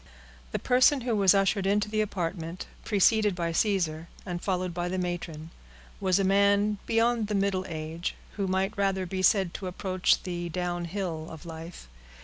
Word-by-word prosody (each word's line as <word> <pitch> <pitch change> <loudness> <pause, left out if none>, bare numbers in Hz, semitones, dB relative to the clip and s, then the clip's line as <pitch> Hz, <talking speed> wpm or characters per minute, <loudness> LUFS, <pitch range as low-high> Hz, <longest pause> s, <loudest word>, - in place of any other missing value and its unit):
The - - -1
person 255 +2 +4
who 235 -2 0
was 195 -2 +5
ushered 195 0 +2
into 205 +1 +2
the 215 0 0
apartment, 175 -4 -3 0.2
preceded 210 -1 +3
by 170 -2 -1
Caesar, 170 -4 0 0.2
and 175 -2 -4
followed 185 -2 -1
by 175 +1 -2
the 185 - -2
matron, 170 -3 -4 0.5
was 185 -1 +2
a 195 - +2
man 200 +1 +3
beyond 230 -1 +2
the 210 - -1
middle 195 -1 0
age, 160 +1 -4 0.2
or - - -20
who 200 -2 0
might 190 +3 0
rather 195 -2 0
be 185 +1 -3
said 190 -1 +3
to 190 - -5
approach 185 0 +1
the 175 -2 -4
downhill 175 -1 -3
of 160 0 -10
life. 165 - -9
185 Hz, 170 wpm, -28 LUFS, 175-200 Hz, 0.5 s, was